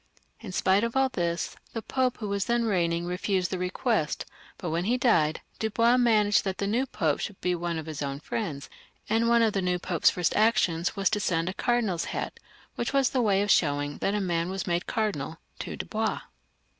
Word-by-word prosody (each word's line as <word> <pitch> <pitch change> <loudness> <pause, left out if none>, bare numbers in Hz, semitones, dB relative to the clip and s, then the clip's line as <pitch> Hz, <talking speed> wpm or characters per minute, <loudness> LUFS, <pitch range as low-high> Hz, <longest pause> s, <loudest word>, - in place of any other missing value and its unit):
In 215 -5 -8
spite 190 +3 +2
of 230 +1 -2
all 265 0 +3
this 170 -6 -2 0.2
the 225 - -4
Pope 255 -2 0
who 215 - -5
was 200 -1 -1
then 235 0 +1
reigning 170 -5 +1
refused 180 +1 -1
the 185 - -2
request, 180 +1 -1 0.3
but 175 -6 -4
when 170 +2 -1
he 240 +4 +2
died, 170 - +2 0.2
Dubois 230 +3 +3
managed 215 -4 +4
that 190 -1 -2
the 200 - -1
new 235 +7 0
Pope 155 - 0
should 200 - -5
be 180 - 0
one 170 -1 -2
of 160 - -5
his 155 -2 -6
own 140 -1 -3
friends; 150 -6 -4 0.4
and 230 +1 +3
one 235 0 +5
of 220 -2 +2
the 195 - 0
new 180 -1 +1
Pope's 175 -2 +2
first 175 -4 0
actions 210 -6 +2
was 195 -1 +1
to 210 - +1
send 170 -3 0
a - - -4
cardinal's 220 -6 0
hat, - - -4 0.3
which 240 - -3
was 275 -2 +3
the 255 - +1
way 200 -3 +3
of 205 - +1
showing 145 -2 +1
that 200 - 0
a - - +1
man 170 -2 0
was 190 0 -3
made 175 -1 -1
cardinal, 185 -9 -2 0.2
to - - -5
Dubois. - - -2
195 Hz, 210 wpm, -27 LUFS, 170-225 Hz, 0.4 s, one